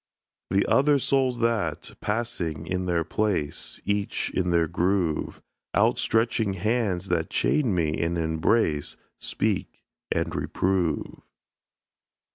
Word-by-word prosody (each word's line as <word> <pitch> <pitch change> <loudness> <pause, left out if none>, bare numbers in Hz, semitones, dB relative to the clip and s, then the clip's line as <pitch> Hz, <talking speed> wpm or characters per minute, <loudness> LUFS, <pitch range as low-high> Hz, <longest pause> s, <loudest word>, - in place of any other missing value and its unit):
The 95 +1 +2
other 145 +1 +4
souls 130 -2 +1
that, 110 -9 0
passing 90 -8 -2
in 90 +1 -2
their 85 -2 +1
place, 95 -7 -1
Each 100 0 -1
in 90 -1 0
their 85 -1 +3
groove; 85 -1 0 0.3
Out - - +3
stretching 110 -2 +1
hands 100 -2 0
that 80 -2 0
chain 125 -10 +2
me 80 -3 0
and 85 +1 0
embrace, 80 0 +1 0.2
Speak - - -2 0.3
and - - 0
reprove. 90 -5 -1
95 Hz, 110 wpm, -26 LUFS, 85-110 Hz, 0.3 s, other